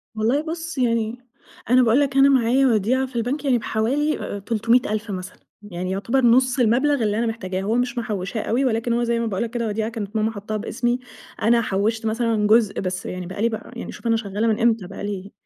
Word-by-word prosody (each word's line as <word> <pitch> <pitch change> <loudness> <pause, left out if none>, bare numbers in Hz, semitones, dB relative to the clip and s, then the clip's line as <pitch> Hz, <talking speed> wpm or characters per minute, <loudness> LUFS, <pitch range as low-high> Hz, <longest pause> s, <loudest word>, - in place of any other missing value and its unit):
والله 230 +7 +1
بص 325 0 -5
يعني 230 -2 0 0.5
أنا 255 +1 +6
باقول 235 +3 +4
لك 275 -2 0
أنا 275 +1 +7
معايا 265 0 +3
وديعة 240 +4 +2
في 260 -1 -13
البنك 250 +6 -2
يعني 255 -3 +3
بحوالي 255 +8 0
أ - - -5
أ - - -6
300,000 220 0 0
مثلًا، 185 -1 -7 0.3
يعني 180 +1 -3
يُعتبر 230 +7 +1
نص 255 +2 +4
المبلغ 250 +3 +3
اللي 210 0 0
أنا 235 - +1
محتاجاه، 190 -5 -3
هو 210 +4 0
مش 245 0 -1
محوشاه 215 -1 -3
أوي 250 +5 0
ولكن 230 -1 0
هو 240 +1 +1
زي 235 0 0
ما 230 - -1
باقول 205 -1 -1
لك 235 - -3
كده 235 -1 -2
وديعة 215 +1 -2
كانت 220 -2 -6
ماما 220 +1 +1
حاطاها 215 0 -5
بإسمي. 240 +3 -1 0.4
أنا 235 +1 +4
حوشت 220 +2 -1
مثلًا 225 -1 +1
جزء 220 -1 +3
بس 185 -1 -3
يعني 180 0 -5
بقى 185 +3 -6
لي 230 - +3
بقى 220 - -7
يعني 240 - -6
شوف - - -7
أنا 225 0 +3
شغالة 210 +1 -2
من 220 0 +1
إمتى 225 -5 +2
بقى 195 - -8
لي 200 -1 -5
230 Hz, 220 wpm, -22 LUFS, 210-245 Hz, 0.5 s, أنا